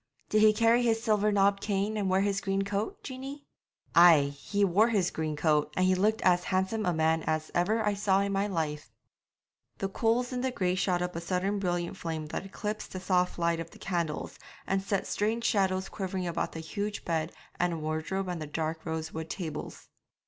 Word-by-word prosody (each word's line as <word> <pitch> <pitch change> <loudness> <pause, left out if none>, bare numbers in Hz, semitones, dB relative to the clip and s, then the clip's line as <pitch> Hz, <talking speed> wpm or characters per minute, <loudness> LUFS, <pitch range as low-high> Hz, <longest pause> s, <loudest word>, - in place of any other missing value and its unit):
'Did 215 - +3
he 215 0 +7
carry 230 +2 +4
his 225 -2 +1
silver 210 -1 +2
knobbed 200 0 +3
cane 205 +1 -1
and 200 -3 0
wear 190 +1 +3
his 200 -1 0
green 195 0 0
coat, 205 - -3
Jeanie?' 270 +2 -7 0.5
'Ay, 160 -5 +7
he 200 +8 0
wore 200 +5 +4
his 200 -7 +1
green 155 -1 -2
coat, 150 -1 +2
and 185 - +3
he 185 - +4
looked 210 +4 +1
as 180 -1 +3
handsome 190 +3 0
a - - +3
man 160 0 +2
as 155 0 -1
ever 215 +6 +1
I 210 - +2
saw 200 -1 +2
in 200 0 -1
my 195 +1 +1
life.' 150 - -3 0.9
The 195 - -1
coals 235 +5 0
in 250 - -2
the 260 - 0
grate 185 -6 0
shot 180 -2 +1
up 180 -1 -4
a 170 - -3
sudden 190 +4 -1
brilliant 175 0 -2
flame 160 -3 -4
that 195 - -4
eclipsed 210 +2 -5
the 185 - -4
soft 180 -1 +1
light 170 -1 +1
of 165 0 -5
the - - -15
candles 170 -5 -3 0.3
and 195 0 0
set 195 0 -1
strange 220 +3 -1
shadows 190 -3 +1
quivering 190 -2 -4
about 170 -1 -2
the 160 - -5
huge 205 +5 -4
bed 160 -1 -1 0.3
and 170 -3 0
wardrobe 160 +5 -2
and 175 -3 -4
the 155 - -4
dark 160 +2 -3
rosewood 160 0 -4
tables. 160 -5 -6
190 Hz, 200 wpm, -29 LUFS, 165-205 Hz, 0.9 s, he